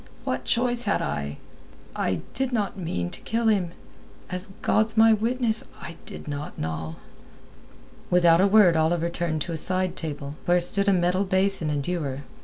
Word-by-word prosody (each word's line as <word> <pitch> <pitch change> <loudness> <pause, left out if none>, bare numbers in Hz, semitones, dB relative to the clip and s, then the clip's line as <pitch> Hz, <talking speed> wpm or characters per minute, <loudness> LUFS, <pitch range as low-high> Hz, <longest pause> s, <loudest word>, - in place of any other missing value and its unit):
What - - -3
choice 245 0 +1
had 205 - +1
I? 70 0 -4 0.6
I 90 -4 -1
did 265 +2 -1
not 210 -5 -1
mean 90 - -3
to - - -6
kill 230 0 0
him—as 180 -1 -5 0.2
God's 220 +1 +2
my 225 0 +7
witness, 225 +1 0 0.2
I 170 - -8
did - - -8
not, 145 0 -6
Noll." 80 0 -4 1.1
Without 175 -1 +5
a 195 - +5
word 200 -4 +5
Oliver 165 +1 +1
turned 170 -3 -2
to - - -6
a 165 - -3
side 185 +3 0
table, 145 -2 -6
where 175 0 +3
stood 200 +3 +5
a - - +5
metal 180 +1 +2
basin 190 -3 +1
and 145 -2 -2
ewer. 145 -7 -3
180 Hz, 165 wpm, -25 LUFS, 155-210 Hz, 1.1 s, my